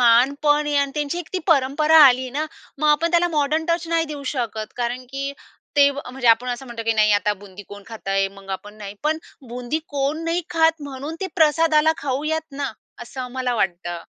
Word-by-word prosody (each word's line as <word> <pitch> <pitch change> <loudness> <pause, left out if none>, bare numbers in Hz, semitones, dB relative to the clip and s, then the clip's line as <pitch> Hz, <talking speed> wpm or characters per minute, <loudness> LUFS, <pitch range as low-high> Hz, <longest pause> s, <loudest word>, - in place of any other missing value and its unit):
मान 245 +3 +5
पण 295 0 +3
आहे 295 -1 0
आणि 280 -1 +2
त्यांची 295 +3 -2
एक 345 - -7
ती 375 - 0
परंपरा 300 +2 +4
आली 255 0 +3
ना. 295 +4 -2 0.3
मग 305 - +1
आपण 315 +3 +3
त्याला 350 0 +3
मॉडर्न 310 0 0 0.2
नाही 330 -1 +2
देऊ 295 -2 -7
शकत 220 -4 -3
कारण 245 +1 -2
की 275 +1 -3 0.4
ते 285 0 +6
म्हणजे 265 -3 -3
आपण 230 +2 +4
असं 245 +2 -4
म्हणतो 235 -2 -6
की 225 - +2
"नाही, 215 -1 +3
आता 205 +1 +2
बुंदी 200 0 -11
कोण 205 0 -10
खात 225 -3 -9
आहे? 195 0 +2
मग 195 0 -11
आपण 205 +2 -6
नाही" 205 -1 -8
पण 310 +1 +1 0.3
बुंदी 245 +5 -3
कोण 290 +3 -1
नाही 335 +2 0
खात 320 -2 +2
म्हणून 280 +4 -6
ते 385 - -1
प्रसादाला 315 0 +4
खाऊयात 305 +4 -2
ना, 275 -3 -3 0.3
असं 240 +2 -8
आम्हाला 250 0 -2
वाटतं. 175 -4 -2
275 Hz, 200 wpm, -22 LUFS, 235-305 Hz, 0.4 s, ते